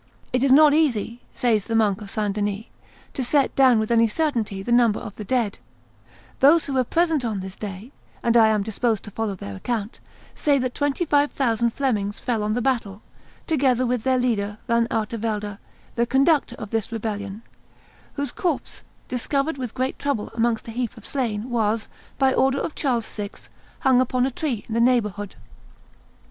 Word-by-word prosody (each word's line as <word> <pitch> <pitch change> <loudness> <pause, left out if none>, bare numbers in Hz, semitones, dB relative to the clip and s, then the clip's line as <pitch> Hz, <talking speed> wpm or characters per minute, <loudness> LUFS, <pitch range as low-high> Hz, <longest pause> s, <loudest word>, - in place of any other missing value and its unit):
"It 250 - +2
is 270 0 +3
not 295 +2 +7
easy," 245 -7 +1
says 220 -5 +1
the 225 - -2
monk 210 -2 +2
of 205 - -8
St. 210 -1 -1
Denis, 205 +1 -2 0.5
"to 265 - -2
set 275 +2 +2
down 260 -3 +6
with 220 +1 -1
any 230 0 +5
certainty 225 -7 -1
the 240 - -4
number 235 -3 +4
of 205 - -8
the 215 - -6
dead; 220 - -1 0.8
those 305 +5 +6
who 280 - -4
were 260 -1 +3
present 325 +1 +1
on 220 -4 -2
this 190 0 -6
day, 205 +4 -7 0.3
and 235 0 +2
I 225 -2 +7
am 215 -2 +2
disposed 220 0 -1
to 210 - -9
follow 220 -1 -2
their 100 - -7
account, 220 - -3 0.3
say 290 -2 +2
that 255 -1 -1
twenty 290 +4 0
five 290 -1 +2
thousand 235 -3 +1
Flemings 210 -7 -1
fell 235 -4 -1
on 210 0 0
the 245 - -1
field, 230 -7 -1 0.5
together 260 -5 +2
with 245 -1 0
their 260 -1 +2
leader, 210 -5 0
Van 235 0 +2
Artevelde, 215 -2 -2 0.3
the 235 0 0
concoctor 270 0 +2
of 210 -3 -8
this 225 -1 -1
rebellion, 210 -1 -4 0.7
whose 285 -3 -3
corpse, 340 -7 -3 0.3
discovered 275 +4 -1
with 250 -3 -5
great 260 0 -2
trouble 275 -7 -2
amongst 230 0 0
a - - -5
heap 240 0 -3
of 225 - -12
slain, 235 -5 -2
was, 220 -1 0 0.3
by 265 -1 +3
order 270 +1 +2
of 310 - -3
Charles 245 -6 0
VI., 205 -1 -5 0.5
hung 260 -1 +4
upon 255 0 +1
a 270 - -1
tree 250 -6 -3
in 220 - -5
the 230 - +2
neighborhood. 210 -5 +1
235 Hz, 185 wpm, -23 LUFS, 210-265 Hz, 0.8 s, not